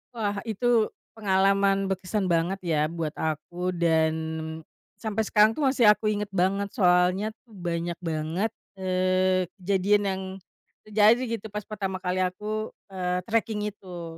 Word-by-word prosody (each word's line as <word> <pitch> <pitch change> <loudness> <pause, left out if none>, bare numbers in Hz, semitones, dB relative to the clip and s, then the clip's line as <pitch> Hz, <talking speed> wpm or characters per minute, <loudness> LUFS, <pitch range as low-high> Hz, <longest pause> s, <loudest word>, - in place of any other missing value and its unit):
Wah 205 -3 -1
itu 225 +1 +2 0.3
pengalaman 195 -1 +2
berkesan 190 +1 -1
banget 170 +4 +1
ya 160 -3 +1
buat 165 -2 -3
aku 175 +4 -2
dan 160 -2 +3 0.8
sampai 220 0 -1
sekarang 215 +1 +5
tuh 300 - -1
masih 255 -4 +3
aku 215 +1 0
inget 210 -1 -2
banget 195 +2 +1
soalnya 180 -1 +3 0.2
tuh 230 - -21
banyak 170 -2 -3
banget, 165 +5 -1 0.3
eee, 185 0 +2 0.2
kejadian 200 +2 +2
yang, 190 0 -2 0.7
terjadi 215 +3 +5
gitu 220 - -10
pas 210 -1 -4
pertama 195 -3 -3
kali 185 0 0
aku, 210 +4 -3 0.2
eee, 180 -1 -1
treking 220 -2 0
itu. 175 -5 -9
190 Hz, 135 wpm, -26 LUFS, 180-210 Hz, 0.8 s, sekarang